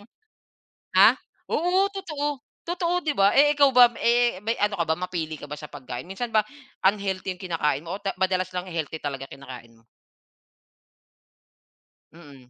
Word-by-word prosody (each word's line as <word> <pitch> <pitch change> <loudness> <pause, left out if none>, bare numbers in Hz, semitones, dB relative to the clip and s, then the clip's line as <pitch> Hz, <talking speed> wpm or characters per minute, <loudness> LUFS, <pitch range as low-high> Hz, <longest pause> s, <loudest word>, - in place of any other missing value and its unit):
ano." 205 - -18 0.9
Ah, - - +8 0.4
oo, 360 +3 +2
totoo, 310 -7 -4 0.4
totoo, 345 0 -1
'di 295 - +1
ba? 195 +1 +5
Eh 295 +1 +6
ikaw 280 -1 +6
ba? 250 -1 +9 0.2
Eh 240 -3 +3
may 230 +2 0
ano 205 0 +1
ka - - +3
ba, 160 - +2
mapili 170 -4 -4
ka 145 - -9
ba 150 - -5
sa 150 - -10
pagkain? 130 -2 -7
Minsan 235 +5 -4
ba 215 - +5 0.5
unhealthy 190 -2 -4
'yung 190 - -14
kinakain 150 -3 -1
mo 175 - -4
o - - -13
ta 195 - -1
madalas 185 -1 +1
lang 180 0 -3
healthy 160 -2 -4
talaga 135 -2 -5
kinakain 125 -4 -11
mo? 115 - -27 2.3
Mm. 140 -6 -15
185 Hz, 170 wpm, -25 LUFS, 150-240 Hz, 2.3 s, ba